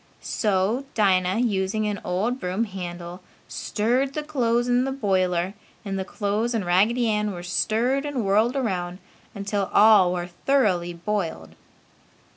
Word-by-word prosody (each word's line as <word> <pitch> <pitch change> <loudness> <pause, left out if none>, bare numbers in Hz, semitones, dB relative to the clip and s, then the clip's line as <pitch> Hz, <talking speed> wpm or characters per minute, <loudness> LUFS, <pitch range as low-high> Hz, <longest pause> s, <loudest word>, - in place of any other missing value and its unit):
So 210 +5 0
Dinah, 185 -2 +2
using 210 -2 0
an 205 -2 -3
old 210 +8 -1
broom 185 +3 -1
handle, 175 -3 -7 0.3
stirred 250 +6 -1
the 305 - -2
clothes 240 -5 0
in 245 0 +3
the 270 - -2
boiler 185 -6 0 0.3
and 195 -1 -3
the - - -1
clothes 210 +4 -2
and 210 -5 -1
Raggedy 215 +7 +3
Ann 210 -1 0
were 175 -1 -7
stirred 230 +9 0
and 280 -7 -2
whirled 215 +6 +2
around 180 -9 -2 0.4
until 200 -1 -2
all 205 -4 +6
were 175 -1 -2
thoroughly 180 -2 +1
boiled. 170 - -3
205 Hz, 140 wpm, -24 LUFS, 185-235 Hz, 0.4 s, all